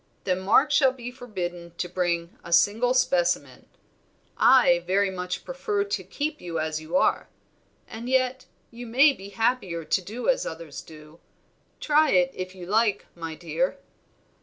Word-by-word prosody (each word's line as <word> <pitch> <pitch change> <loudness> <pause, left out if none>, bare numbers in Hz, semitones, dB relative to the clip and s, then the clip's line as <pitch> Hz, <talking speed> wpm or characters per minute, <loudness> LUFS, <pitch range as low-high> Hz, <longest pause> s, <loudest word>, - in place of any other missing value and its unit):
"Then 185 -1 0
Mark 235 +10 +3
shall 275 -2 +4
be 245 -1 -8
forbidden 180 -9 -6
to 180 - -2
bring 175 -1 -2
a 170 - -10
single 215 +8 +3
specimen. 180 -9 0 0.7
I 240 -10 +5
very 195 +1 +2
much 180 -1 -5
prefer 430 -5 -2
to 405 0 -3
keep 300 +1 -4
you 170 -2 -5
as 155 0 -2
you 165 +3 -1
are. - - +1 0.6
And 230 +3 -7
yet 260 0 0 0.2
you 240 +1 -9
may 270 +6 +5
be 195 -4 -11
happier 200 -6 -1
to 185 - +1
do 220 +7 -6
as - - +2
others 160 -2 -7
do; 155 +1 -15 0.6
try 305 +1 +3
it, 270 -1 +3
if 185 0 -6
you 180 -2 -9
like, 210 +1 +1
my 165 -2 -6
dear." 165 - -2
195 Hz, 160 wpm, -25 LUFS, 175-255 Hz, 0.7 s, I